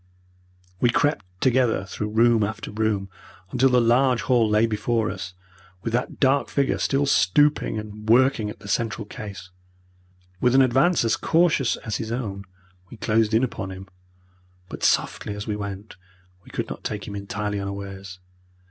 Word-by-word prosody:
We 120 Hz, -, +3 dB
crept 120 Hz, -3 st, +1 dB, 0.2 s
together 125 Hz, -6 st, +2 dB
through 105 Hz, +3 st, -4 dB
room 115 Hz, 0 st, +4 dB
after 105 Hz, +1 st, -4 dB
room, 105 Hz, -2 st, -1 dB, 0.4 s
until 130 Hz, +2 st, +3 dB
the 125 Hz, -1 st, +4 dB
large 125 Hz, +1 st, +3 dB
hall 120 Hz, -4 st, +3 dB
lay 105 Hz, +1 st, +4 dB
before 110 Hz, -1 st, 0 dB
us, 90 Hz, -2 st, -7 dB, 0.5 s
with 115 Hz, -, -3 dB
that 120 Hz, +1 st, -2 dB
dark 135 Hz, 0 st, +2 dB
figure 140 Hz, -1 st, 0 dB
still 140 Hz, +1 st, +1 dB
stooping 140 Hz, -, +3 dB
and 105 Hz, 0 st, -7 dB
working 125 Hz, -2 st, +4 dB
at -, -, -10 dB
the -, -, -10 dB
central 110 Hz, +2 st, -1 dB
case. 100 Hz, -4 st, -9 dB, 0.9 s
With 125 Hz, +5 st, +3 dB
an 135 Hz, -, +7 dB
advance 135 Hz, +4 st, +3 dB
as 115 Hz, -, +2 dB
cautious 160 Hz, -7 st, +2 dB
as 105 Hz, -3 st, -4 dB
his 110 Hz, -1 st, -5 dB
own 100 Hz, -5 st, -4 dB, 0.4 s
we 120 Hz, -, -11 dB
closed 110 Hz, 0 st, +1 dB
in 115 Hz, -, +3 dB
upon 110 Hz, -5 st, -3 dB
him, 95 Hz, 0 st, -9 dB, 0.8 s
but -, -, -8 dB
softly 105 Hz, -, +1 dB
as 105 Hz, 0 st, -6 dB
we 105 Hz, -, -2 dB
went 100 Hz, -1 st, -7 dB, 0.5 s
we -, -, -16 dB
could -, -, -3 dB
not -, -, -8 dB
take 105 Hz, -1 st, -4 dB
him 100 Hz, -, -6 dB
entirely 100 Hz, +1 st, -3 dB
unawares. 100 Hz, -1 st, -6 dB
110 Hz, 165 wpm, -24 LUFS, 100-125 Hz, 0.9 s, an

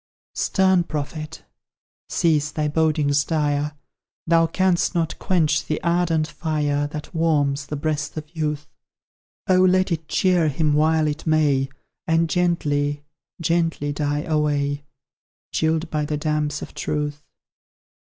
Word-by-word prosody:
Stern 190 Hz, -2 st, +2 dB
prophet! 155 Hz, +1 st, -5 dB, 0.7 s
Cease 155 Hz, -3 st, +2 dB
thy 150 Hz, 0 st, -1 dB
bodings 150 Hz, -2 st, +2 dB
dire 150 Hz, -2 st, 0 dB, 0.5 s
Thou 165 Hz, 0 st, +4 dB
canst 185 Hz, +1 st, +1 dB
not 165 Hz, -2 st, -1 dB
quench 155 Hz, -5 st, +1 dB
the 155 Hz, -, -2 dB
ardent 170 Hz, -2 st, +2 dB
fire 150 Hz, -3 st, -1 dB
That 150 Hz, +4 st, -8 dB
warms 145 Hz, -4 st, +1 dB
the 150 Hz, -, -4 dB
breast 150 Hz, +1 st, -2 dB
of 155 Hz, +2 st, -8 dB
youth. 150 Hz, -2 st, -2 dB, 0.8 s
Oh, 185 Hz, -1 st, +4 dB
let 185 Hz, 0 st, +3 dB
it 160 Hz, -2 st, -2 dB
cheer 180 Hz, -4 st, +2 dB
him 150 Hz, +1 st, +1 dB
while 155 Hz, +1 st, +3 dB
it 150 Hz, +2 st, -3 dB
may, 145 Hz, -4 st, +2 dB, 0.4 s
And 165 Hz, 0 st, +2 dB
gently, 145 Hz, -5 st, 0 dB, 0.4 s
gently 165 Hz, -3 st, 0 dB
die 145 Hz, 0 st, -1 dB
away 145 Hz, -2 st, 0 dB, 0.7 s
Chilled 160 Hz, +1 st, 0 dB
by 150 Hz, -1 st, 0 dB
the 150 Hz, 0 st, -2 dB
damps 150 Hz, -1 st, -1 dB
of -, -, -9 dB
truth! 150 Hz, -1 st, -3 dB
155 Hz, 125 wpm, -23 LUFS, 145-165 Hz, 0.8 s, Thou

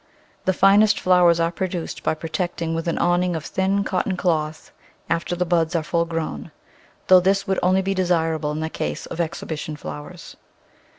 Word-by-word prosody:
The -, -, +3 dB
finest 205 Hz, +3 st, +5 dB
flowers 180 Hz, -2 st, +4 dB
are 165 Hz, 0 st, +1 dB
produced 175 Hz, -1 st, -4 dB
by -, -, 0 dB
pro 160 Hz, +1 st, -7 dB
tecting 170 Hz, -1 st, -2 dB
with 165 Hz, +1 st, -3 dB
an 170 Hz, -, 0 dB
awning 175 Hz, 0 st, +1 dB
of 160 Hz, -1 st, -5 dB
thin 195 Hz, +1 st, 0 dB
cotton 185 Hz, 0 st, -1 dB
cloth 155 Hz, -3 st, -1 dB, 0.4 s
after 170 Hz, +1 st, 0 dB
the 180 Hz, +1 st, -1 dB
buds 170 Hz, -1 st, +1 dB
are 165 Hz, -, +1 dB
fully 170 Hz, +1 st, -1 dB
grown 160 Hz, -, -4 dB, 0.3 s
— -, -, -32 dB
though 185 Hz, 0 st, +8 dB
this 195 Hz, +2 st, +1 dB
would 190 Hz, -1 st, 0 dB
only 185 Hz, +1 st, +2 dB
be 195 Hz, +1 st, 0 dB
desirable 165 Hz, -4 st, 0 dB
in 155 Hz, +1 st, -3 dB
the 160 Hz, -, -2 dB
case -, -, -4 dB
of 170 Hz, -, -4 dB
exhibition 155 Hz, -2 st, -4 dB
flowers. 75 Hz, -, -9 dB
170 Hz, 185 wpm, -22 LUFS, 160-185 Hz, 0.4 s, though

